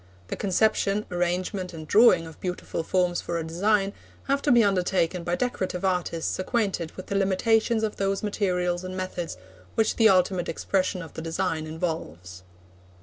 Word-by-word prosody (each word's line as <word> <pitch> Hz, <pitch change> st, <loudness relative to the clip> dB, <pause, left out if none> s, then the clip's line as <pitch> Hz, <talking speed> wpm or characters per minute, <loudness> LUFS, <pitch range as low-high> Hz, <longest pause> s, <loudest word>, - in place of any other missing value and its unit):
The -, -, -2 dB
conception, 205 Hz, +1 st, +1 dB
arrangement, 180 Hz, +1 st, -2 dB
and 155 Hz, -1 st, -8 dB
drawing 205 Hz, -5 st, +6 dB
of 160 Hz, -1 st, -12 dB
beautiful 180 Hz, -2 st, -3 dB
forms 180 Hz, +1 st, +1 dB
for 170 Hz, -, -3 dB
a 165 Hz, -, -2 dB
design, 195 Hz, +5 st, +1 dB, 0.3 s
have 275 Hz, 0 st, 0 dB
to 290 Hz, -, +2 dB
be 240 Hz, -2 st, +6 dB
undertaken 185 Hz, -3 st, +1 dB
by 175 Hz, +1 st, 0 dB
decorative 190 Hz, -5 st, -2 dB
artists 180 Hz, -3 st, -1 dB
acquainted 190 Hz, -5 st, -1 dB
with 185 Hz, -, -7 dB
the 200 Hz, -, -4 dB
limitations 220 Hz, +4 st, +2 dB
of 215 Hz, -, -2 dB
those 195 Hz, 0 st, -1 dB
materials 180 Hz, -4 st, 0 dB
and 185 Hz, 0 st, -5 dB
methods 180 Hz, -, -4 dB, 0.4 s
which 220 Hz, -1 st, +1 dB
the 225 Hz, -1 st, +6 dB
ultimate 185 Hz, -1 st, +2 dB
expression 185 Hz, -2 st, -1 dB
of 165 Hz, -, -11 dB
the -, -, -6 dB
design 165 Hz, -1 st, -2 dB
involves. 90 Hz, -, -5 dB
185 Hz, 160 wpm, -26 LUFS, 170-200 Hz, 0.4 s, drawing